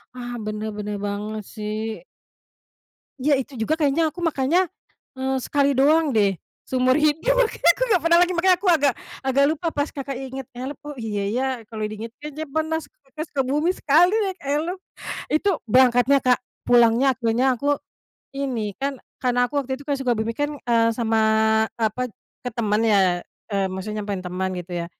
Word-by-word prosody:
Ah, 245 -1 -6
bener, 215 +1 -3
bener 210 0 -4
banget 210 +1 -4
sih. 215 +1 -4 1.2
Iya, 285 +3 +2
itu 265 -1 -10
juga 225 +8 0
kayaknya, 310 0 +1
aku 350 - -8
makanya, 330 +3 +2 0.5
eee, 265 0 -1
sekali 280 +1 +2
doang 295 +2 +3
deh, 200 -4 +2 0.3
seumur 255 0 +3
hidup 315 +12 +2
makanya - - +2
aku - - -2
nggak 370 -7 +3
pernah 340 0 +6
lagi. 360 +1 +3
Makanya 365 +1 +5
aku 395 - -2
agak 290 -6 +4 0.3
agak 275 +1 +3
lupa 320 +2 -2
pas 290 +1 -1
kakak 275 -2 -5
ingat 265 -1 -6
Elf, 260 +4 -6
oh 295 - -5
iya 210 -2 -2
ya, 260 +2 0 0.2
kalau 220 0 -8
diinget 225 +2 -7
kayaknya 300 +1 -6
pernah 315 +2 -1
s 320 - -7
ke 275 +2 -11
Sukabumi 295 +4 0
sekali 340 +6 +4
naik 390 -4 0
Elf, 310 +6 -1 0.5
itu 390 +6 +2 0.2
berangkatnya, 255 +3 +5
Kak. 250 -1 +4 0.2
Pulangnya 240 +2 +5
akhirnya 250 +2 +1
aku 285 +3 0 0.6
ini 230 -8 -2
kan, 275 -1 -3 0.2
karena 245 -1 +1
aku 290 - -6
waktu 265 - -5
itu - - -11
kan 285 - +1
Sukabumi 230 -4 -1
kan, 290 0 0
eee, 230 -1 +2
sama 225 -1 +1 0.6
apa, 225 +2 -1 0.3
ke 245 - -2
temen 215 -2 0
ya, 190 -5 +3 0.3
eee, 195 - +1
maksudnya 210 +2 -4
nyamperin 200 -2 -3
temen 185 +1 -2
gitu 175 +1 -10
ya. - - -7
260 Hz, 170 wpm, -23 LUFS, 225-295 Hz, 1.2 s, pernah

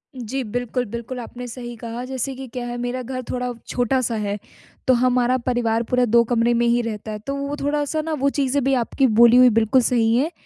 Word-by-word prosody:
जी, 255 +2 -4
बिल्कुल, 245 +2 -2
बिल्कुल 235 +3 -6
आपने 245 +1 -8
सही 240 0 -7
कहा 230 +2 -6
जैसे 265 +1 -3
कि 265 0 -8
क्या 245 -1 -4
है 240 0 -4
मेरा 245 +1 -3
घर 255 +1 -5
थोड़ा 250 0 -2 0.2
छोटा-सा 245 -1 0
है, 205 -1 -2 0.5
तो 255 - +6
हमारा 250 +1 +2
परिवार 235 -2 +1
पूरा 250 0 +3
2 235 +1 +4
कमरे 240 0 +2
में 240 0 +2
ही 240 +1 +3
रहता 220 -1 -5
है 210 - -5
तो 275 - -2
वो 280 +1 -3
थोड़ा-सा 295 +2 0
ना 320 +1 -3
वो 280 +1 +3
चीज़ें 275 0 +1
भी 270 +1 +2
आपकी 260 +2 +1
बोली 235 +1 +8
हुई 250 0 +8
बिल्कुल 235 +4 +3
सही 230 -2 +2
हैं 290 +8 +1
245 Hz, 220 wpm, -22 LUFS, 235-260 Hz, 0.5 s, बोली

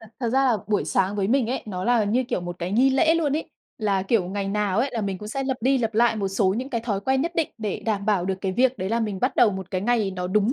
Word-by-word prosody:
Thật 220 - -14
thật 235 - 0
ra 265 +3 +2
là 245 -4 +3
buổi 210 - +1
sáng 195 +2 0
với 195 0 0
mình 255 -2 +2
ấy, 260 - -2
nó 185 -3 -4
là 235 -3 +3
như, 240 +6 +1
kiểu, - - -1
một 175 0 -6
cái 180 +2 -3
nghi 260 +5 +4
lễ 320 +5 +3
luôn 300 -4 +1
ấy. 320 - -5 0.3
Là, 200 -3 0
kiểu, 195 0 +1
ngày 195 0 -3
nào 205 0 0
ấy 265 +3 +1
là 235 - -2
mình 195 -2 -3
cũng 210 +2 -8
sẽ 270 +5 -3
lặp 265 -1 -1
đi 265 +2 +2
lặp 225 -2 -2
lại 235 0 +3
một 200 -2 -1
số 195 -1 +1
những 260 +3 -4
cái 235 -3 -1
thói 210 -4 -2
quen 265 +5 +1
nhất 335 +2 -2
định, 330 -2 +1
để 210 -3 -3
đảm 205 -2 -1
bảo 200 -5 +2
được 190 - 0
cái 190 -1 -2
việc 255 +3 +2
đấy 185 - -2
là 230 +2 0
mình 210 -4 -3
bắt 255 +1 0
đầu 230 - +5
một 190 -1 -6
cái 185 - -1
ngày 220 -2 +1
nó 180 -1 -4
đúng 210 +5 +2
215 Hz, 320 wpm, -24 LUFS, 195-250 Hz, 0.3 s, đầu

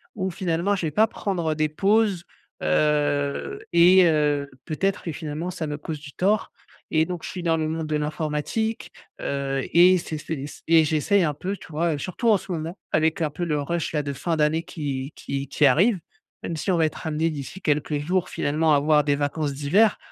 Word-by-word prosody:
où 190 -2 -2
finalement, 175 +3 0
je 175 -4 -2
vais - - -3
pas 220 +8 +4
prendre, 175 -7 -2
heu, 155 - -1
des 155 0 +1
pauses, 200 +1 +2 0.4
heu 145 - +1
et 180 +2 +7
heu, 150 -3 +1 0.2
peut-être 195 +5 -1
que 165 - -3
finalement 160 +2 -4
ça 170 -3 -4
me 150 0 -4
cause 155 +1 -6
du 145 -2 -11
tort 205 +4 +1 0.4
et 160 0 +4
donc 175 -1 -5
je - - -5
suis 180 - -6
dans 165 -1 +2
le 155 -1 -1
monde 160 -1 -3
de 155 - -1
l'informatique, 155 +9 -2 0.3
heu 135 -1 -2
et 180 +2 +7
c'est 160 -2 -5
c'est 155 - -5
s 145 - -9
et 165 0 +6
j'essaie 160 +6 +2
un 150 -3 +1
peu, 190 +5 -3
tu - - -13
vois, 165 +2 0
heu, - - -5
surtout 210 - -1
en 215 - +6
ce 190 - -9
moment 165 +2 -4
avec 160 +1 +1
un 155 - +1
peu 160 +4 -5
le 150 -3 0
rush, 170 +3 -2
là, 150 - +1
de 140 0 -3
fin 165 +5 -2
d'année 155 +2 +2
qui 140 -2 -5
qui 140 0 -4
qui 150 - +2
arrive, 190 +7 +4 0.4
même 165 - -3
si 190 - -1
on 175 - +2
va 160 - +3
être 155 - -8
amené 160 +1 0
d'ici 155 +5 -7
quelques 150 -2 0
jours 180 +4 -1
finalement 155 +2 +1
à 145 - +5
avoir 150 +1 +3
des 145 -1 +2
vacances 145 +1 -1
d'hiver. 170 +11 +3
160 Hz, 220 wpm, -24 LUFS, 150-180 Hz, 0.4 s, et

